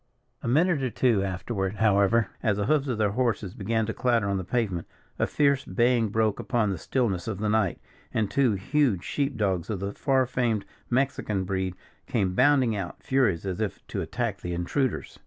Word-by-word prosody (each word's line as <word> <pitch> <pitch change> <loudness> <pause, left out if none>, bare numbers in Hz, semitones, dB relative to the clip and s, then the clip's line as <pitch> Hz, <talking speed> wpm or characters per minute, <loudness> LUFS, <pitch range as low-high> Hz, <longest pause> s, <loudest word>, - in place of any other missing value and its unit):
A - - -5
minute 155 +4 +3
or 130 - 0
two 115 -4 +2
afterward, 95 +1 -2
however, 105 +1 +3
as 105 -4 +1
the 105 - 0
hoofs 145 +2 +2
of 125 -4 -1
their 105 -2 +2
horses 110 -5 -1
began 110 +2 -1
to 110 - -3
clatter 120 -5 +1
on 100 -1 0
the 95 - -3
pavement, 95 -4 -1 0.3
a - - +2
fierce 140 -2 +2
baying 120 -2 +2
broke 110 0 +1
upon 115 -5 0
the 95 - -4
stillness 100 -8 -1
of 110 -4 -2
the 105 +2 -1
night, 105 -4 +1 0.3
and 110 -3 0
two 130 -5 +3
huge 100 - +1
sheep 140 +1 -2
dogs, 95 -4 0
of 105 -4 -2
the 100 +1 -3
far 135 -2 +2
famed 120 -4 0 0.2
Mexican 120 -6 0
breed, 95 -1 -2 0.3
came 95 -6 0
bounding 130 -1 +4
out, 95 -4 -6
furious, 115 -11 +1
as 95 +2 -3
if 105 - -3
to - - -2
attack - - -3
the 90 0 -3
intruders. 125 +10 -2
110 Hz, 195 wpm, -27 LUFS, 95-125 Hz, 0.3 s, bounding